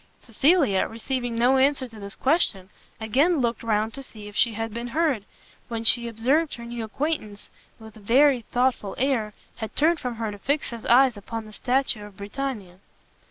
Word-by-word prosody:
Cecilia, 260 - +2
receiving 245 +1 -3
no 245 +3 +4
answer 270 0 +2
to 225 -2 -13
this 200 0 -7
question, 240 - +1 0.3
again 275 +11 +2
looked 240 -3 0
round 220 0 0
to 275 - -6
see 215 -5 -11
if 205 - -11
she 230 - +2
had 225 0 -4
been 235 +1 -4
heard; 280 -6 0 0.4
when 230 -2 -4
she 235 +1 +4
observed 265 +8 +1
her 235 - -9
new 235 -1 -5
acquaintance, 220 -3 -4 0.3
with 220 -1 -13
a - - -13
very 255 +5 +4
thoughtful 245 -3 -1
air, 235 -6 0 0.2
had 220 - -6
turned 320 +2 +3
from 250 -2 -4
her 225 -1 -3
to 205 - -9
fix 285 +6 -1
his 235 -2 -7
eyes 250 -1 +5
upon 225 +2 -6
the 215 - -13
statue 255 -2 0
of 205 -2 -12
Britannia. 205 -4 -5
235 Hz, 185 wpm, -25 LUFS, 215-270 Hz, 0.4 s, eyes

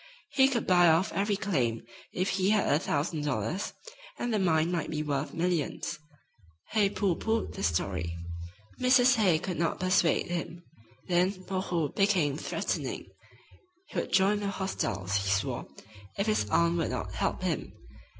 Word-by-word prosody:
He 270 -2 +5
could 250 -4 -1
buy 175 -1 +5
off 165 +5 +3
every 200 +1 +1
claim 130 - -1 0.3
if 185 +2 -1
he 190 +1 +1
had 210 -2 +3
a 145 - +3
thousand 150 0 -1
dollars, 150 +6 -2 0.4
and 240 -1 -2
the 215 - +2
mine 165 -2 +2
might 170 -3 -2
be 155 -1 -2
worth 145 -1 -2
millions. 170 -1 -2 0.7
Hay 210 -3 +3
pooh 195 -3 0
poohed 225 +4 -1
the - - -6
story. 90 -1 -1 0.6
Mrs. 255 0 +5
Hay 185 -7 +4
could 175 +1 -4
not 165 - 0
persuade 185 -2 +2
him. 170 0 -5 0.4
Then 185 +1 +1
"Moreau" 180 -5 -1
became 185 -8 +2
threatening. - - -3 0.8
He - - -2
would - - -4
join 200 +2 +4
the 205 - -2
hostiles, 100 - -2
he 95 0 -1
swore, 100 0 -1 0.5
if 200 - +1
his 215 - +1
aunt 170 +5 +3
would 165 - 0
not - - -4
help - - -1
him. - - -2
175 Hz, 160 wpm, -29 LUFS, 150-200 Hz, 0.8 s, He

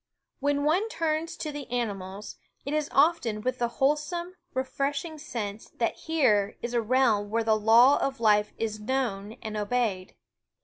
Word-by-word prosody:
* - - -55
When 285 +1 +1
one 360 +9 +2
turns 325 -4 -2
to 305 - -4
the 290 -3 -7
animals, 205 -4 -4 0.3
it 280 - -3
is 305 -1 0
often 275 -8 +2
with 255 +2 -2
the 240 - +1
wholesome, 300 +6 0 0.2
refresh 275 +2 -2
"^ - - -9
ing 315 -2 -8
sense 220 -8 -5
that 230 - 0
here 215 -11 +1
is 240 0 -3
a 240 - +2
realm 225 -3 +2
where 230 +2 0
the 220 -1 +3
law 230 +6 +6
of 270 -2 -2
life 210 -2 +3
is 215 -1 -3
known 215 -4 -2
and 215 -1 -5
obeyed. 210 -3 -1
245 Hz, 175 wpm, -27 LUFS, 215-290 Hz, 0.3 s, law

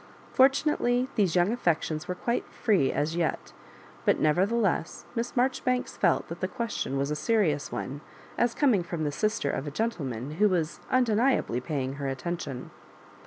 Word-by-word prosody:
Fortu 270 +3 +5
nately 250 -4 +1
these 190 -5 +1
young 180 +3 +3
affections 165 -8 0
were 180 - -2
quite 235 +6 -1
free 200 - +2
as 155 +3 -1
yet; 165 - -2 0.5
but - - +3
nevertheless, 185 +2 +1
Miss 235 0 -3
Marjoribanks 255 0 +1
felt 175 -4 +2
that 170 +1 -7
the 185 - -1
question 200 - -3
was 140 +2 -1
a - - 0
serious 155 -3 +1
one, 140 +3 -4 0.3
as 240 -1 +1
coming 250 -10 +3
from 170 -2 -4
the 145 - 0
sister 210 -3 0
of 140 - -3
a - - -1
gentleman 145 - -3
who 210 - +6
was 170 -4 -1
undeni 250 +1 +3
ably 120 +2 -3
paying 135 -1 -3
her 140 - -1
attention. 135 -1 -4
175 Hz, 165 wpm, -28 LUFS, 150-230 Hz, 0.5 s, who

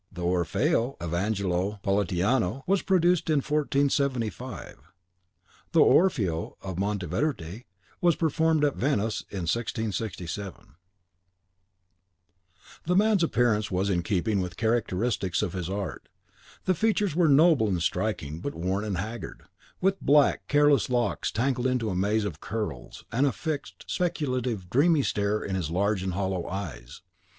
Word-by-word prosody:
The 90 -2 -7
Orfeo 90 - +1
of 85 -1 -4
Angelo 100 +1 -1
Politiano 100 - +1
was 195 +1 +2
produced 175 -3 +2
in 155 - +3
1475. 140 -5 -1 1.0
The 165 - +4
Orfeo 105 - +3
of 95 -2 -6
Monteverde 100 - -2 0.4
was 175 -3 +4
performed 160 -1 +2
at 145 - 0
Venice 110 -6 0
in 100 - -5
1667.) 105 - -4 2.1
This 180 +1 +3
man's 210 -2 +4
appearance 120 -9 +2
was 95 +1 0
in 90 -2 +1
keeping 100 +2 0
with 90 -1 -4
the - - -19
characteristics 110 -4 0
of 85 - -2
his 90 -2 -4
art. 95 -8 -5 0.6
The 185 - +3
features 205 -2 +1
were 170 -2 +4
noble 145 -4 +5
and 95 -4 0
striking, 85 -9 -2
but 140 - -5
worn 95 +4 -1
and 105 -4 -2
haggard, 110 +6 -6 0.4
with 195 +1 +1
black, 145 0 +3
careless 145 -6 +4
locks 120 -1 0
tangled 125 +2 0
into 125 -5 0
a - - -2
maze 105 +3 +1
of 85 -7 -5
curls, 105 - -5
and 130 +6 +2
a - - +2
fixed, 155 -1 -5
speculative, 130 - -2
dreamy 145 - +3
stare 105 -1 0
in 95 - -4
his 90 -5 -2
large 100 +3 0
and 95 -1 -2
hollow 95 -2 -2
eyes. 75 -9 -7
110 Hz, 140 wpm, -27 LUFS, 95-140 Hz, 2.1 s, noble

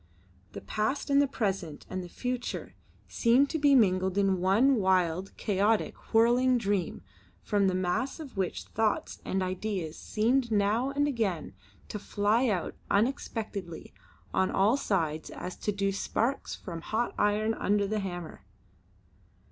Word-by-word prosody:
The - - -7
past 270 +7 -2
and 280 0 +6
the 285 - +3
present 195 - -3
and 185 0 -4
the 175 - -9
future 250 +4 -4 0.3
seemed 255 +4 +3
to 320 - -1
be 285 -1 +5
mingled 190 -4 +3
in 195 -2 +2
one 230 +9 +4
wild, 185 -2 +1
chaotic, 210 +1 0
whirling 245 +3 +4
dream, 200 -5 -1 0.4
from 200 -2 +2
the 185 - +1
mass 185 - -1
of 295 -5 -9
which 190 -2 -2
thoughts 220 -1 -1
and 190 0 -1
ideas 185 -3 -3
seemed 235 +3 +1
now 215 +5 +2
and 285 +1 +1
again 200 - -2 0.4
to 210 - -4
fly 210 +5 +1
out 185 -7 -1 0.2
unexpectedly 210 - -2 0.4
on 190 0 +2
all 205 +6 +3
sides 160 - -1
as 180 - -6
do 200 -1 -1
sparks 230 +6 -1
from 170 -3 -7
hot 230 +6 -1
iron 210 +2 +2
under 205 -2 +1
the 215 +2 -1
hammer. 175 -4 -6
205 Hz, 140 wpm, -29 LUFS, 185-235 Hz, 0.4 s, and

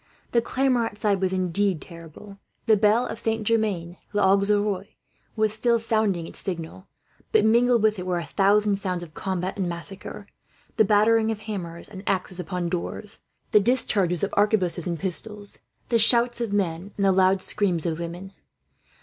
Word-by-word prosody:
The 235 - +3
clamour 255 -1 +1
outside 205 -2 -1
was 190 -1 +1
indeed 185 0 +1
terrible. 170 +5 -12 0.3
The 220 -2 +5
bell 215 +4 +3
of - - -5
Saint 225 -1 -2
Germain 200 -6 0 0.2
l'Auxerrois 200 0 +2 0.5
was 215 -1 +1
still 235 +2 +2
sounding 215 -6 0
its - - -7
signal, 180 +1 -6 0.4
but 440 - +4
mingled 235 +1 +4
with 215 -2 +2
it 180 - -6
were 180 -1 0
a 170 - -3
thousand 200 +5 +2
sounds 185 -3 -3
of 160 -3 -12
combat 185 +1 -3
and 180 -2 0
massacre, 190 +4 -6 0.5
the 220 - +5
battering 220 +2 +3
of 220 -1 -3
hammers 180 -6 -6
and 195 -3 -10
axes 185 -1 -1
upon 180 0 -3
doors, 180 +4 -5 0.3
the 210 - +6
discharges 200 -7 +1
of 200 - -1
arquebuses 190 -5 +2
and 170 -1 -2
pistols, 205 +4 -4 0.3
the 230 - +3
shouts 240 +2 +4
of 230 -3 -2
men 190 -1 -2
and 200 - +1
the 195 - +5
loud 190 0 +3
screams 185 -6 0
of 165 -1 -2
women. 175 +3 -7
200 Hz, 165 wpm, -24 LUFS, 180-215 Hz, 0.5 s, the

